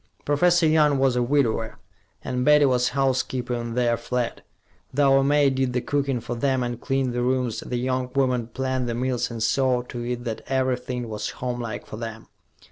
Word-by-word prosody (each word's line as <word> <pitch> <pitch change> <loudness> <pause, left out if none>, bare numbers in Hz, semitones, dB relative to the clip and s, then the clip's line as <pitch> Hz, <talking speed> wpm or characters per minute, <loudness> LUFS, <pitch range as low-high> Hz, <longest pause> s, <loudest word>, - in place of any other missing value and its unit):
Professor 170 +4 +3
Young 155 -2 +4
was 135 -2 +2
a 125 - +2
widower, 120 -4 0 0.5
and 125 -1 -2
Betty 150 +1 +6
was 125 -2 +2
housekeeper 130 -2 0
in 120 -1 -3
their 120 -1 +2
flat; 125 -1 -3 0.5
though 135 0 +4
a - - +2
maid 140 -1 +3
did 130 -1 0
the 125 - 0
cooking 140 -2 -1
for 120 - -5
them 130 +1 0
and 120 -1 -4
cleaned 135 -2 0
the 120 - -1
rooms, 125 -2 0
the 125 - -4
young 130 +1 -1
woman 125 -4 +1
planned 130 0 -2
the 115 - -2
meals 125 0 -1
and 115 -2 -4
saw 125 +1 +2
to 120 -1 -6
it 120 0 -3
that 115 -3 -4
everything 125 -2 -1
was 105 -1 -4
homelike 120 -2 -4
for 110 - -8
them. 115 -1 -7
125 Hz, 190 wpm, -24 LUFS, 120-135 Hz, 0.5 s, Betty